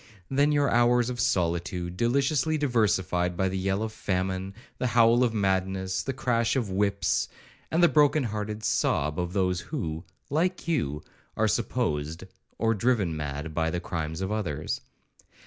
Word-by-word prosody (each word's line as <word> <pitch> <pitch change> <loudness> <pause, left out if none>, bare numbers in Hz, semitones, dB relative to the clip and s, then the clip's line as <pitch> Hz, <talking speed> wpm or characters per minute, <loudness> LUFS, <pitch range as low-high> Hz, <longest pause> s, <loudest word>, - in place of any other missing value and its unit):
—Then 145 +2 +3
your 145 -1 +3
hours 120 0 +3
of 120 - -6
solitude, 85 -2 0
deliciously 140 +7 +1
diversified 95 - +1
by 95 +1 +1
the 95 - -4
yell 95 +2 0
of 110 -1 -4
famine, 95 0 -2 0.2
the 125 - +1
howl 120 +1 +5
of 120 - +2
madness, 95 -2 0
the 135 - -3
crash 120 -3 0
of 115 -7 -1
whips, 100 +1 +1 0.4
and 165 +2 +2
the - - +9
broken 150 -2 +4
hearted 105 -1 -4
sob 75 -4 +1
of 90 0 -2
those 90 -3 +1
who, 85 - -4 0.3
like 180 +6 0
you, 75 - -1 0.3
are - - +3
supposed, 75 +4 -1 0.3
or 115 0 +2
driven 105 -6 +1
mad 75 +1 -4
by 80 0 0
the 90 +1 -2
crimes 80 -1 -4
of 95 +1 -2
others! 80 -9 -2
100 Hz, 155 wpm, -27 LUFS, 90-120 Hz, 0.4 s, the